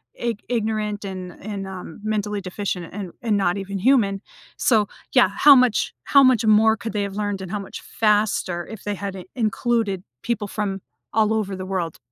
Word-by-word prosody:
ig 235 -3 -3
ignorant, 215 -3 -1
and 185 -2 -6
and, 200 -2 -5
um, 185 -2 -8
mentally 210 -1 -1
deficient, 185 -2 -4
and 190 -3 -5
and 220 -3 +2
not 180 -1 +1
even 195 0 -4
human, 205 -4 +3 0.4
so, 215 -5 +3 0.3
yeah, - - +6
how 290 -1 +9
much 250 -4 +3
how 280 - +6
much 250 -3 +4
more 220 +1 +5
could 205 +1 -5
they 205 -1 0
have 200 -1 -5
learned, 205 -2 -2
and 185 -2 -7
how 210 - -2
much 195 - -8
faster, 205 -5 +1
if 220 -3 -9
they 205 - -2
had 200 0 -5
i 185 -2 -8
included 220 -4 0 0.2
people 215 -3 -2
from 195 -2 -3 0.3
all 220 0 +3
over 205 -3 -1
the 185 0 -6
world, 180 -4 -3
205 Hz, 190 wpm, -23 LUFS, 195-220 Hz, 0.4 s, how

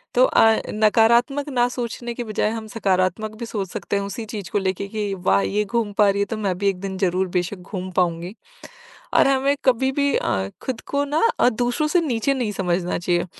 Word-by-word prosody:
तो - - +6
अ, 225 - +4 0.2
नकारात्मक 235 +6 +3
ना 245 -3 +2
सोचने 240 -1 -4
के 245 - -4
बजाय 215 -1 0
हम 225 -1 -5
सकारात्मक 200 0 0
भी 235 - -4
सोच 205 -4 -4
सकते 200 - -4
हैं 200 - -1
उसी 220 +3 -5
चीज 205 -4 -6
को 205 - -1
लेके 190 0 -2
कि 205 -1 -3
वाह! 100 - +2
ये 210 - 0
घूम 225 0 -1
पा 210 -1 +5
रही 200 0 0
है - - +2
तो 220 +2 -5
मैं 195 -4 -1
भी 200 +1 +2
एक 190 -2 -3
दिन 195 -1 -4
ज़रूर 185 0 +1
बेशक 180 +3 -2
घूम 185 +1 -6
पाऊँगी। 175 +1 -1 0.8
और - - +5
हमें 275 +1 +2
कभी 260 0 +3
भी 280 0 +1
अ, 95 -5 -1
खुद 255 -3 -4
को 285 0 +2
ना 290 +2 0 0.2
अ, - - +6
दूसरों 245 +5 0
से 355 +3 +3
नीचे 275 -3 0
नहीं 240 -6 -2
समझना 180 -2 -1
चाहिए। 175 0 0
210 Hz, 215 wpm, -22 LUFS, 190-245 Hz, 0.8 s, तो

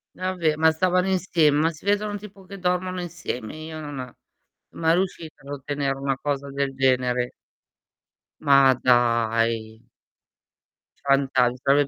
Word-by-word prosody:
Vabbè 180 -4 0
ma 160 +1 +4
stavano 180 +3 +1
insieme, 165 -6 +2
ma 165 +1 +3
si 155 +4 -16
vedono 205 0 0
tipo 200 -1 -13
che 200 +1 -9
dormono 180 0 -1
insieme, 160 -9 -6
io 160 0 -7
non 140 -5 -6 0.6
mai 165 0 +2
riuscita 175 -3 -3
ad 140 +1 -9
ottenere 140 0 -2
una 135 -1 -1
cosa 140 -1 -3
del 140 -1 -2
genere. 125 -2 +1 1.1
Ma 140 -2 +6
dai. 115 -2 +2 1.2
Fantas 135 -3 +3
mi 125 - -10
sarebbe 140 +1 +3
145 Hz, 130 wpm, -24 LUFS, 130-175 Hz, 1.2 s, Ma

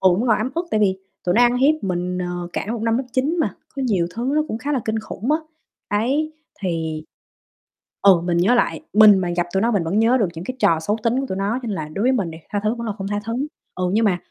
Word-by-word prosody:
ừm, 185 -1 +5
vẫn 245 - 0
còn 220 - +4
ấm 225 +5 -2
ức 340 +1 -2
tại 215 - +1
vì 190 -2 +2 0.3
tụi 175 - +1
nó 240 - +5
ăn 245 0 +4
hiếp 275 +4 +4
mình, 180 -1 -2
ờ, 175 -1 -4
cả - - -3
một 235 -2 -4
năm 225 0 +2
lớp 265 - -2
9 280 +6 +1
mà, - - 0 0.2
có 270 - -2
nhiều 195 -9 +1
thứ 240 +3 -2
nó 305 - +3
cũng 220 - -3
khá 285 +4 -3
là 270 - +1
kinh 220 0 -1
khủng 220 +2 -6
á, 310 - +3 0.6
đấy, 290 +7 0 0.3
thì 160 -4 -2 1.0
ừ, 190 -4 +6
mình 175 -1 0
nhớ 190 +8 +4
lại, 240 - +1
mình 210 -2 +8
mà 180 -2 -1
gặp 175 0 +1
tụi 190 - +2
nó 230 +2 +2
mình 200 -6 +1
vẫn 175 +6 0
nhớ 235 +3 +4
được 210 - +2
những 170 +2 -7
cái 255 - -4
trò 165 -7 +3
xấu 205 +7 -1
tính 240 +3 +2
của 270 - -2
tụi 190 - -3
nó 205 +5 -1
cho 240 - -6
nên 205 - -2
là 155 -3 -4
đối 200 - -2
với 255 - +4
mình 200 -10 0
đi, 160 - -9
tha 205 - -1
thứ 215 +2 +1
vẫn 235 -1 -5
là 210 - -2
không 195 0 -4
tha 205 0 -1
thứ, 230 - -3 0.4
ừ, 185 - -3
nhưng 220 +2 +3
mà 185 -4 +2
210 Hz, 290 wpm, -21 LUFS, 180-245 Hz, 1.0 s, mình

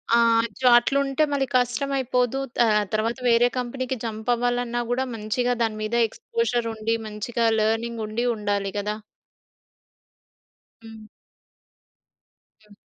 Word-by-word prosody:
ఆహ్, 230 -1 +4
అయ్యో! 235 +3 -2
అట్లుంటే 275 +3 0
మళ్ళీ 275 -1 +1
కష్టం 250 +2 +1
అయిపోదు. 250 0 0 0.2
త - - -4 0.3
తర్వాత 225 +3 0
వేరే 235 +1 +5
కంపెనీకి 255 +1 -3
జంప్ 220 +1 -5
అవ్వాలన్నా 245 0 -1
కూడా 260 +2 0
మంచిగా 245 +3 -1
దాని 220 -1 -1
మీద 215 +2 -2
ఎక్స్‌పోజర్ 340 - -2
ఉండి, 220 +1 -1
మంచిగా 225 +3 -2
లెర్నింగ్ 225 +1 0
ఉండి 225 +3 -2
ఉండాలి 205 -2 -2
గదా! 210 +1 -2 1.9
హ్మ్. 220 -1 -12 1.6
హ్మ్. 210 - -19
235 Hz, 115 wpm, -24 LUFS, 220-250 Hz, 1.9 s, వేరే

